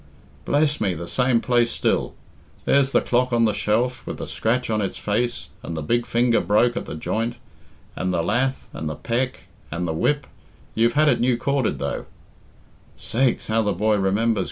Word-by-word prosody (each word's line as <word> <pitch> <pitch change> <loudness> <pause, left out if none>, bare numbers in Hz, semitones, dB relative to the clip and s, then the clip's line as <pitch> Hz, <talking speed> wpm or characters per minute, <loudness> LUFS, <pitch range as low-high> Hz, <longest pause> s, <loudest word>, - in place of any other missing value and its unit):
"Bless 150 +1 +2
me! 95 -4 +1
the 85 +2 -6
same 125 0 +2
place 120 -2 +2
still. - - 0 0.5
There's 135 -1 +3
the - - +4
clock 125 +1 +1
on 120 -1 +3
the 110 - +2
shelf, 120 +3 0
with - - -4
the - - -5
scratch 120 +3 -1
on 110 -1 +1
its 95 - -3
face 120 +4 -1
and 85 - -5
the 80 - -3
big 120 +9 0
finger 120 0 +2
broke 120 +4 +3
at - - -4
the - - -5
joint, 115 +9 -2 0.6
and 95 - -1
the 85 -2 0
lath 130 +8 0
and 75 0 -4
the 75 - -4
peck 120 - -2 0.3
and 85 +2 -3
the 80 - -1
whip 145 - +1 0.5
you've 115 +1 +2
had 155 +3 +4
it 130 -5 +3
new 125 0 +2
corded, 135 0 0
though - - -4 0.4
" - - -30
"'Sakes, 125 +1 0
how 110 +1 +1
the 105 -2 0
boy 110 0 +2
remembers!" 105 +3 +1
115 Hz, 195 wpm, -23 LUFS, 105-125 Hz, 0.6 s, the